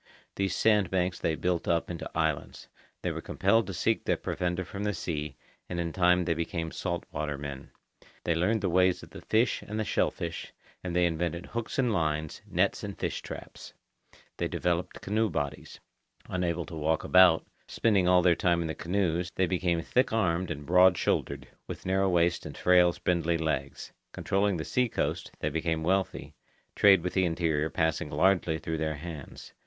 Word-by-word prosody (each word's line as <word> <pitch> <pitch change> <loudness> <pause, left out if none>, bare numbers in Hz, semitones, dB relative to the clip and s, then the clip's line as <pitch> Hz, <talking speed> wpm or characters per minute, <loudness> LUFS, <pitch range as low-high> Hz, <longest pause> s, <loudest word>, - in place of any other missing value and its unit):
These 100 -1 -1
sand 105 -5 +3
banks 90 -1 0
they 80 - 0
built 90 0 -1
up 85 0 +1
into 85 - -6
islands. 80 -2 -2 0.4
They - - 0
were - - -5
compelled 100 +2 +1
to 95 - -5
seek 110 +4 0
their - - +1
provender 90 0 -2
from 100 +3 -6
the 105 -1 -1
sea, 75 -4 -4 0.3
and 85 - -3
in 85 -1 -2
time 90 -1 +3
they 85 - +1
became 80 0 -3
salt 85 -2 -3
water 75 -2 -3
men. 70 -1 -7 0.5
They 85 - +1
learned 95 +7 +1
the 95 - 0
ways 90 0 +3
of - - -13
the - - -10
fish 110 0 +1
and 105 +1 -5
the - - +1
shellfish, - - -2 0.3
and 90 -2 -4
they 90 0 +4
invented 85 +1 -2
hooks 115 -1 -5
and 125 -4 +2
lines, 80 -4 -1
nets - - 0
and - - -6
fish - - -3
traps. - - -10 0.6
They - - -1
developed 90 0 -2
canoe 110 +2 0
bodies. 75 -4 -4 0.5
Unable 90 -2 -1
to 85 - -9
walk 80 +1 0
about, 90 -3 +6 0.2
spending 100 -5 +2
all 90 -1 +5
their 90 -1 +5
time 85 0 +1
in - - -3
the 80 - -3
canoes, 90 -1 -1
they 95 - +2
became 85 -2 0
thick 125 +7 +1
armed 90 -5 +1
and 75 -3 -5
broad 90 +1 +5
shouldered, - - -1 0.2
with - - -7
narrow 95 +1 +2
waists 85 -1 +2
and - - -8
frail 90 -1 +5
spindly 85 -1 0
legs. 75 -4 -3 0.2
Controlling 100 -1 0
the 80 - -4
sea 125 -1 +1
coast, - - -2
they 75 - 0
became 80 +1 -1
wealthy, 95 +3 -1 0.4
trade 95 -4 +6
with 90 - -2
the 95 - +2
interior 80 -3 0
passing 80 -2 0
largely 85 +1 +2
through 80 0 -4
their 80 -1 -1
hands. 75 -2 -9
90 Hz, 185 wpm, -29 LUFS, 80-95 Hz, 0.6 s, about